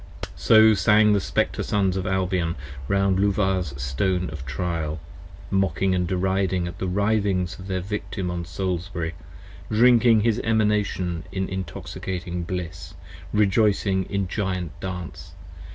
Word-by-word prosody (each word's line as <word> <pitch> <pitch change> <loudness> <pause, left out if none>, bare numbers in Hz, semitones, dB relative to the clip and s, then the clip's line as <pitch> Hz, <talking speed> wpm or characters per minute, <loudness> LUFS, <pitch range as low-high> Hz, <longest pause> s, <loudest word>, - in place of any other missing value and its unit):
So 110 0 +6
sang 105 0 +4
the 100 - +3
Spectre 75 - -1
Sons 95 -2 +1
of 95 - -2
Albion 90 -3 0 0.3
round 100 +1 +2
Luvah's 95 -7 0
Stone 90 +8 -1
of 75 -5 -7
Trial: 80 -1 -2 0.5
Mocking 95 -1 +1
and 90 -1 0
deriding 95 -1 0
at 85 - -8
the 95 - -2
writhings 100 -2 0
of 95 - -9
their 95 -1 -2
Victim 95 -2 -4
on 85 -1 -3
Salisbury: 85 -1 -3 0.6
Drinking 115 0 +5
his 115 0 +1
Emanation 105 -6 0
in 95 -1 -2
intoxicating 90 -1 -5
bliss, 85 0 -6 0.4
rejoicing 100 -2 +2
in 100 0 -2
Giant 90 -4 -2
dance. 90 -1 -7
95 Hz, 125 wpm, -24 LUFS, 90-100 Hz, 0.6 s, So